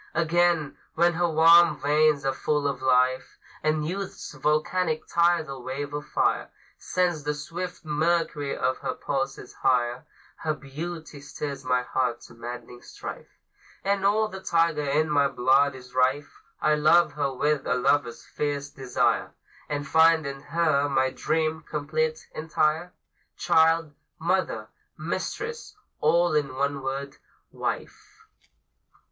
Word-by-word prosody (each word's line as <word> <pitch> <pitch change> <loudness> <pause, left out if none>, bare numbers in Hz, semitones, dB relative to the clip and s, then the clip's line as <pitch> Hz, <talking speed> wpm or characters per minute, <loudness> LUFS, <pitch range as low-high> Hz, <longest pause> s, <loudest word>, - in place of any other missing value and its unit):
Again, 170 -2 +1 0.2
when 175 +1 +3
her 175 +1 +1
warm 165 +2 +6
veins 150 0 +2
are 135 - +1
full 150 +1 0
of 140 - -3
life, 130 0 +2 0.2
And 155 0 0
youth's 195 +2 -5
volcanic 155 +3 0
tidal 170 -6 +1
wave 140 +3 -5
of 150 +1 -5
fire - - 0 0.3
Sends 175 -4 0
the 150 0 -1
swift 170 +4 -6
mercury 150 -2 0
of 130 - 0
her - - -3
pulses 135 -2 -3
higher, 125 -1 +1 0.3
Her 155 -1 -2
beauty 155 +1 -7
stirs 140 -1 -6
my 125 -1 +1
heart 125 -2 -1
to - - -14
maddening 120 +1 -8
strife, - - -9 0.6
And 200 0 0
all 215 +2 +3
the 190 -2 -8
tiger 165 -4 +1
in 150 +2 +1
my 145 -2 +3
blood 135 +2 +3
is 125 -1 -13
rife; 130 +3 0 0.2
I 155 - +3
love 155 +2 +4
her 145 -2 -1
with 145 +1 0
a - - +2
lover's 125 -1 +1
fierce 145 -1 -3
desire, 130 -2 0 0.4
And 145 -1 -3
find 160 +1 +5
in 140 0 -5
her 155 -2 +1
my 130 -1 +2
dream, 160 +1 -1
complete, 155 +1 -2
entire, 160 +2 0 0.5
Child, 165 -2 +3 0.2
Mother, - - -1 0.3
Mistress 460 +2 -4 0.2
all 170 +2 +3
in 140 -4 0
one 140 +1 -1
word 135 +1 -4 0.3
Wife. - - -6
150 Hz, 135 wpm, -26 LUFS, 135-165 Hz, 0.6 s, warm